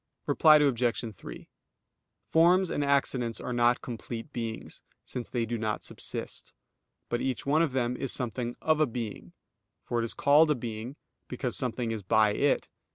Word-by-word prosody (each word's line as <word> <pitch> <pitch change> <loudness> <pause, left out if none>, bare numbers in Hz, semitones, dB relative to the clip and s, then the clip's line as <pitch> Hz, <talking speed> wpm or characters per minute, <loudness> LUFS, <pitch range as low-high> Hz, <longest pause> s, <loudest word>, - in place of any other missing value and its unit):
Reply 155 -1 +6
Obj. 120 -6 +1
3: - - -10 0.8
Forms 175 +3 +4
and 145 - 0
accidents 135 -4 0
are 125 - -4
not 120 0 +2
complete 115 +2 -6
beings, 115 -2 -5 0.2
since 125 -2 -6
they 120 -2 -1
do 115 0 -3
not 110 -1 -2
subsist: - - -6 0.5
but 120 - -2
each 130 -1 -2
one 150 +3 +3
of 160 -6 +1
them 125 -1 0
is 135 0 -3
something 120 0 -3
"of 155 -1 +3
a 155 - +4
being"; 115 -3 -6 0.5
for 120 -1 -1
it - - -1
is 115 - -3
called 150 +3 +5
a 150 - +3
being, 115 +1 -6 0.3
because 125 -4 -3
something 120 -2 -2
is 110 -2 -3
by 105 +2 +3
it. 145 +6 +1
120 Hz, 165 wpm, -29 LUFS, 115-140 Hz, 0.8 s, Reply